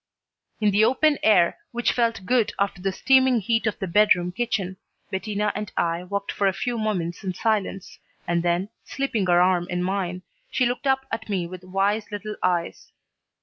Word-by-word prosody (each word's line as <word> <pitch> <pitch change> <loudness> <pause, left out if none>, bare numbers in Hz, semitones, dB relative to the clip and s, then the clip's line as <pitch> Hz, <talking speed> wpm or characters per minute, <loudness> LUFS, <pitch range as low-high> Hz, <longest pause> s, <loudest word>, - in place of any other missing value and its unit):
In 210 -2 +3
the 205 +2 +4
open 280 +6 +3
air, 195 - +4
which 240 0 +1
felt 230 -5 0
good 245 0 +2
after 200 -2 -1
the 195 +1 0
steaming 260 +3 +4
heat 225 +2 0
of 215 - -1
the - - -3
bedroom 180 -1 +3
kitchen, 195 -4 -2 0.3
Bettina 205 +2 -1
and 210 0 -5
I 170 +1 0
walked 200 +2 -3
for 200 - +1
a 190 - +2
few 235 +4 -2
moments 185 -5 -2
in 185 -2 -3
silence, 210 -3 -2 0.3
and 170 0 +1
then, 175 +3 0
slipping 235 -8 -2
her 175 0 +5
arm 180 -1 +3
in 180 0 -1
mine, 185 -1 -2 0.3
she 255 - +1
looked 245 +3 -2
up 265 0 +2
at 225 - -4
me 190 -4 -1
with 180 +1 -9
wise 200 +3 -1
little 210 +1 -5
eyes. 175 -2 -1
200 Hz, 185 wpm, -24 LUFS, 180-225 Hz, 0.3 s, her